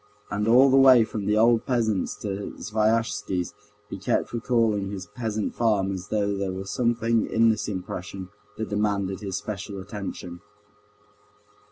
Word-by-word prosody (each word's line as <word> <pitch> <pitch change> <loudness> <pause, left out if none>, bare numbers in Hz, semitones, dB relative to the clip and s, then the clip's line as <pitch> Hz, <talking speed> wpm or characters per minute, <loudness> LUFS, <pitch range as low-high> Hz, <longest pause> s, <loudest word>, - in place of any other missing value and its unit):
And 105 +1 -1
all 130 +4 +6
the 135 - +5
way 130 -3 +8
from 105 -2 -4
the 105 +1 +2
old 115 +1 +4
peasant's 110 -6 0
to 100 -1 -4
Sviazhsky's 105 -4 0 0.3
he 100 - -7
kept 95 - -1
recalling 115 -4 +1
this 95 -3 -6
peasant 110 0 -3
farm 105 -5 +1
as 95 0 -5
though 100 -1 0
there 100 -1 -2
were 95 +1 -5
something 115 +1 +1
in 115 0 +4
this 110 - -2
impression 95 -1 -6 0.3
that 110 - -4
demanded 100 -2 -1
his 95 -3 -4
special 100 -1 -6
attention. 95 -3 -7
105 Hz, 150 wpm, -25 LUFS, 95-115 Hz, 0.3 s, way